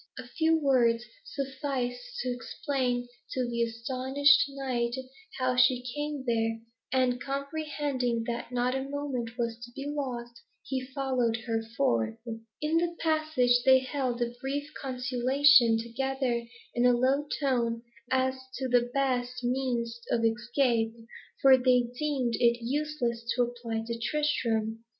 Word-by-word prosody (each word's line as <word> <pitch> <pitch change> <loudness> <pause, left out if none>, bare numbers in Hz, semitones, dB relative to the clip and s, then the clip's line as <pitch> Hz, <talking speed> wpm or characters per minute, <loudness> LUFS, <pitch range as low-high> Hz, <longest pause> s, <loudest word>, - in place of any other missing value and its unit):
A 255 -2 -7
few 320 +5 +2
words 245 -6 +3 0.2
sufficed 275 - -4
to - - -2
explain 245 0 -2 0.3
to 255 -1 0
the 235 0 -2
astonished 260 +4 +3
knight 255 -3 -2 0.4
how 255 -1 +1
she 250 0 +4
came 295 -2 -3
there, 225 -2 0 0.3
and 250 -1 +2
comprehending 280 -4 -2
that 235 +1 -4
not 250 +1 +1
a 265 - -1
moment 260 -5 -3
was 235 -1 -2
to 240 - -8
be 275 - -5
lost, 245 -5 -4 0.2
he 265 -1 -2
followed 255 -4 0
her 225 -2 0 0.2
forth. 110 -4 +1
In 230 +8 -3
the 345 0 0
passage, 310 -7 +2
they 265 0 +7
held 255 -2 -1
a 235 0 -3
brief 285 +2 -3
consultation 255 -1 +4
together 240 +1 -2 0.3
in 240 - +1
a 250 0 +6
low 270 +4 +2
tone, 235 -5 0 0.3
as 260 0 +2 0.2
to 260 - -2
the 245 -1 +3
best 250 -2 0
means 240 -2 -1
of 230 -1 +2
escape, 230 0 +1 0.5
for 265 -1 +8
they 250 -1 +3
deemed 275 -6 0
it 235 -1 +4
useless 270 -4 -1
to 245 - +3
apply 235 -2 -3
to 230 0 -4
Tristram. 230 -5 0
250 Hz, 135 wpm, -29 LUFS, 235-275 Hz, 0.5 s, for